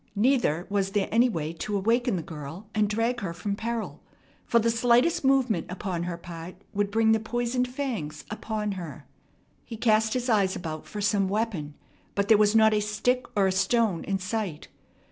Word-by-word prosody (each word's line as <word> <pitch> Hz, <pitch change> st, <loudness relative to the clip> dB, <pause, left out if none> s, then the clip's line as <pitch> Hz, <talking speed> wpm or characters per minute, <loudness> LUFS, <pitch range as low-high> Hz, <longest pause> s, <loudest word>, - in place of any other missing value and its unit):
Neither 210 Hz, -, +2 dB
was 195 Hz, -1 st, -1 dB
there 205 Hz, -2 st, +1 dB
any 235 Hz, +3 st, +4 dB
way 160 Hz, -6 st, -3 dB
to 200 Hz, +5 st, -3 dB
awaken 230 Hz, +3 st, +1 dB
the 170 Hz, -, -3 dB
girl 155 Hz, +5 st, -8 dB
and 215 Hz, -1 st, +2 dB
drag 230 Hz, +3 st, 0 dB
her 185 Hz, -6 st, -4 dB
from 200 Hz, +3 st, -3 dB
peril, 230 Hz, +1 st, -4 dB, 0.5 s
for 235 Hz, -, +3 dB
the 230 Hz, 0 st, +3 dB
slightest 245 Hz, +9 st, +3 dB
movement 265 Hz, -9 st, +2 dB
upon 180 Hz, -2 st, -3 dB
her 175 Hz, -1 st, -4 dB
part 170 Hz, 0 st, -9 dB, 0.2 s
would 205 Hz, 0 st, 0 dB
bring 220 Hz, +1 st, +3 dB
the 220 Hz, -, +4 dB
poisoned 240 Hz, +3 st, -1 dB
fangs 225 Hz, -, -4 dB
upon 215 Hz, -1 st, -3 dB
her. 180 Hz, -5 st, -7 dB, 0.6 s
He 230 Hz, -, -8 dB
cast 220 Hz, 0 st, +2 dB
his 250 Hz, 0 st, -1 dB
eyes 200 Hz, -5 st, +2 dB
about 155 Hz, -3 st, -6 dB
for 210 Hz, -, -5 dB
some 200 Hz, -2 st, +2 dB
weapon, 195 Hz, -9 st, -2 dB, 0.4 s
but 200 Hz, 0 st, 0 dB
there 220 Hz, -, +8 dB
was 210 Hz, +1 st, +4 dB
not 220 Hz, -1 st, +6 dB
a 210 Hz, -, +3 dB
stick 240 Hz, +4 st, 0 dB
or 200 Hz, -2 st, +4 dB
a 190 Hz, -, +2 dB
stone 190 Hz, -1 st, +1 dB
in 195 Hz, -, 0 dB
sight. 190 Hz, -4 st, -4 dB
210 Hz, 185 wpm, -27 LUFS, 185-230 Hz, 0.6 s, there